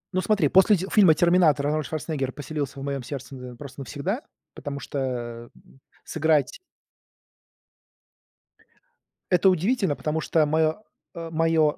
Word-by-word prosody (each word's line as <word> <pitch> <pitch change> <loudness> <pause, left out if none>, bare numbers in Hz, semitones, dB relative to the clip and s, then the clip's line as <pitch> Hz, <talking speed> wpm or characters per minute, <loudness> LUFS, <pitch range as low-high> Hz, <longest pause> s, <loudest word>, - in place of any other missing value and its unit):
Ну, 185 - +1
смотри, 195 -8 +2
после 190 +5 +6
ти 190 +1 -3
фильма 190 -7 +6
"Терминатор" 170 -5 +3
Арнольд 155 0 0
Шварценеггер 150 -4 -3
поселился 145 -2 -5
в - - -6
моём 140 -1 -3
сердце, 135 +1 -7
э, 125 -1 -9
просто 140 +2 -11
навсегда, 170 - -3 0.3
потому 140 -1 -6
что, 140 - -6 0.6
э, - - -19 0.4
сыграть 160 - +1 2.7
Это 180 +1 +5
удивительно, 190 - +1
потому 155 +2 -2
что 160 0 +2
моё, 160 +5 +1 0.3
э, 165 -1 -6
моё 160 -2 +2
155 Hz, 135 wpm, -25 LUFS, 145-175 Hz, 2.7 s, после